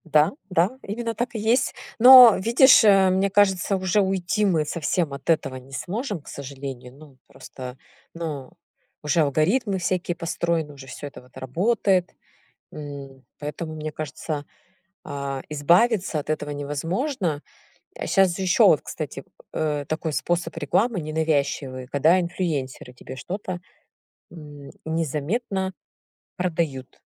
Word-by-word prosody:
Да, 155 +3 +5 0.2
да, 185 +7 +1
именно 230 +3 -4
так 240 +2 -3
и - - -2
есть. 230 +4 +2 0.3
Но 250 -2 +10
видишь, 240 +5 +6
э, 195 -3 +6
мне 190 +2 +2
кажется, 195 -1 +2
уже 190 +2 +1
уйти 190 +1 0
мы 165 -6 +2
совсем 160 0 -1
от 140 +3 -8
этого 150 -5 +1
не 130 +1 -11
сможем, 200 - -4
к - - -23
сожалению. 135 -2 -8
Ну, 145 -3 -16
просто, 130 0 -10 0.4
ну, 155 -6 -6 0.5
уже 150 +2 +2
алгоритмы 190 - +1
всякие 180 -1 -1
построены, 165 -2 -2
уже 135 -1 -12
всё 145 - -7
это 140 - -11
вот 125 +1 -18
работает. 180 - 0 0.6
М. 140 -3 -9 0.2
Поэтому, 155 +2 -5
мне 155 0 -5
кажется, 150 0 -5 0.6
а, 140 -2 -4
избавиться 175 +5 +2
от 150 - -8
этого 150 -1 -2
невозможно. 160 - -2 0.6
А - - -5
щас 190 -3 +3
же 190 - -5
ещё, 185 0 +5
вот, - - +4
кстати, - - -6 0.3
э, 150 -2 -1
такой 155 0 -3
способ 175 +2 -1
рекламы 200 - +1
ненавязчивый, 145 -4 -1
когда 155 +7 +3
инфлюенсеры 155 -8 -3
тебе 130 +1 -10
что-то, 185 +6 -5 0.7
м, 145 -4 -11
незаметно 165 - -2 0.6
продают. 160 -7 -3
165 Hz, 135 wpm, -24 LUFS, 145-190 Hz, 0.7 s, Но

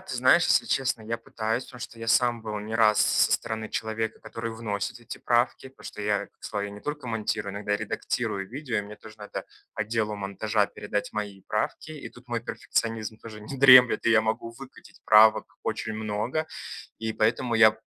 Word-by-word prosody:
Ты - - -7
знаешь, - - +5
если - - +3
честно, 130 -4 0
я 115 +1 -3
пытаюсь, 115 +1 -3
потому 125 -2 -13
что 115 - -8
я 115 - -6
сам 120 -1 +3
был 105 -1 -4
не 110 +2 -6
раз 110 -2 +4
со - - +3
стороны 110 -1 -2
человека, 110 0 -3
который 115 0 -6
вносит 110 0 -4
эти 120 0 -8
правки, 120 +2 +1
потому 130 - -19
что - - -8
я, 105 -1 0
к - - -22
славе, 105 -1 -3
я - - -9
не 105 - -10
только 150 -3 -5
монтирую, 110 -2 -2
иногда 105 0 -1
редактирую 95 -1 -3
видео. 130 -2 -4
И - - +1
мне 105 +1 -10
тоже 110 0 -14
надо 105 - -6 0.3
отделу 110 0 -1
монтажа 100 +1 0
передать 105 0 -4
мои 100 -2 -5
правки, 105 +8 -2
и 155 -2 -7
тут 125 0 -18
мой 120 -1 -1
перфекционизм 110 -2 -2
тоже 110 -2 -10
не 120 +6 -7
дремлет, 130 -3 +8
и - - +5
я 115 -1 +6
могу 110 +1 -2
выкатить 130 +3 -14
правок 110 0 +5
очень 110 - -3
много. 110 +8 -2 0.5
И 110 0 -3
поэтому 115 +2 +1
я 110 -1 +6
110 Hz, 195 wpm, -27 LUFS, 105-120 Hz, 0.5 s, дремлет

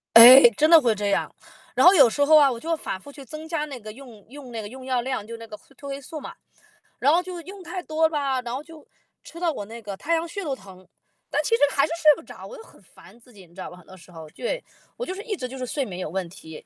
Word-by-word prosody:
哎， 245 +4 +12 0.2
真 310 +1 +3
的 330 -1 +9
会 235 -3 +2
这 205 -1 -2
样。 - - -1 0.4
然 - - +5
后 375 - +9
有 275 -9 +7
时 285 +5 0
候 310 +2 +6
啊， 280 -3 +5
我 235 - -5
就 330 +4 -2
反 190 -10 -6
复 285 - -14
去 280 -1 -12
增 310 +5 -9
加 320 -2 -2
那 275 -4 -8
个 215 -1 -10
用 235 -5 -14
用 270 -2 -11
那 225 -1 -5
个 205 - -7
用 260 +3 -11
药 255 -1 -1
量， 255 -4 -4
就 230 - -9
是 - - -7
那 230 - -11
个 215 - -9
会 - - -27
褪 280 - -11
黑 275 0 -6
素 310 +4 -8
嘛。 - - -9 0.7
然 285 - +3
后 345 +2 +3
就 360 -1 -8
用 385 +3 -11
太 355 +1 -6
多 315 +1 +1
吧， 280 -4 -1
然 240 -1 -6
后 280 - -6
就， 320 -1 -15 0.4
吃 335 - -12
到 340 -2 +1
我 205 -8 -6
那 230 +2 -10
个 200 -2 -7
太 335 - -2
阳 330 - -1
穴 400 +4 -6
都 280 -4 -3
疼， 185 -4 -16 0.4
但 - - 0
其 460 - +2
实 - - -4
还 275 - +2
是 310 - -8
睡 305 -2 +7
不 330 - -13
着， - - -12
我 - - -10
就 450 - -12
很 - - -20
烦 235 - -19
自 240 0 -22
己， 200 - -15
你 170 - -24
知 190 - -15
道 - - -6
吗， 180 - -13
很 180 - -18
多 190 - -14
时 180 - -18
候。 160 -2 -11
对， - - -4 0.3
我 - - -5
就 370 - -5
是 395 - -7
一 445 -4 -3
直 255 -8 -5
就 265 - -9
是 255 - -4
睡 275 +3 -2
眠 185 -6 -7
有 180 - -4
问 185 0 -3
题， 160 -4 -12
265 Hz, 330 characters per minute, -24 LUFS, 220-320 Hz, 0.7 s, 哎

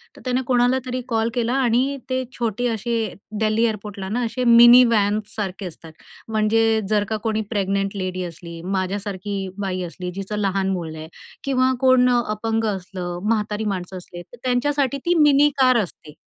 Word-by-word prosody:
तर - - -15
त्याने 255 +1 +1
कोणालातरी 250 0 +1
कॉल 225 -1 0
केला 240 0 0
आणि 255 +3 +1
ते 260 0 0
छोटे 235 0 -1
असे 235 +2 -3 0.5
दिल्ली 220 +1 +2
एअरपोर्टला 205 -3 -3
ना 235 +5 -1
असे 250 +2 -3
मिनीव्हॅनसारखे 215 -5 +4
असतात. 165 -2 -10 0.4
म्हणजे 220 0 +2
जर 210 -1 +2
का 220 - -1
कोणी 220 -1 0
प्रेग्नंट 195 -1 -1
लेडी 185 -1 -3
असली, 170 -1 -8
माझ्यासारखी 195 +2 -3 0.2
बाई 190 -2 -2
असली 180 +1 -6
जिचं 195 +2 -4
लहान 195 -1 0
मुल 170 -4 -4
आहे 155 0 -8 0.4
किंवा 260 -2 +2
कोण 255 -1 +5
अ, 245 -1 +3
अपंग 225 +1 -1
असलं 180 -2 -6
म्हातारी 215 -1 -1
माणसं 185 0 -6
असले 175 -1 -10
तर 210 +7 -15
त्यांच्यासाठी 270 +2 +1
ती 345 - +3
मिनीकार 280 -3 +4
असते. 155 -4 -11
215 Hz, 155 wpm, -22 LUFS, 190-245 Hz, 0.5 s, कोण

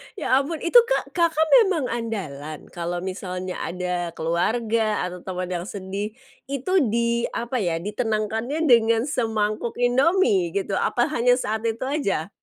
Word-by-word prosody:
Ya 265 -9 +2
ampun 305 +3 -3
itu 345 +8 +5
Kak, - - -1
Kakak 330 -2 +2 0.2
memang 330 -10 0
andalan? 175 -11 -5
Kalau 175 0 -3
misalnya 185 -1 -5
ada 180 -1 -3
keluarga 215 +7 0
atau 180 0 -8
teman 185 -1 -4
yang 175 -1 -3
sedih, 200 +1 -5 0.3
itu 275 +5 -3 0.2
di, 235 +1 +1
apa 240 +2 -2
ya, 175 -6 0
ditenangkannya 220 - -2
dengan 230 -1 +5
semangkuk 225 -4 -1
Indomie 245 - +3
gitu? 195 -1 -1
Apa 240 +4 +1
hanya 245 -3 +3
saat 220 -2 -3
itu 225 +2 -2
aja? 260 - -1
220 Hz, 140 wpm, -24 LUFS, 185-250 Hz, 0.3 s, itu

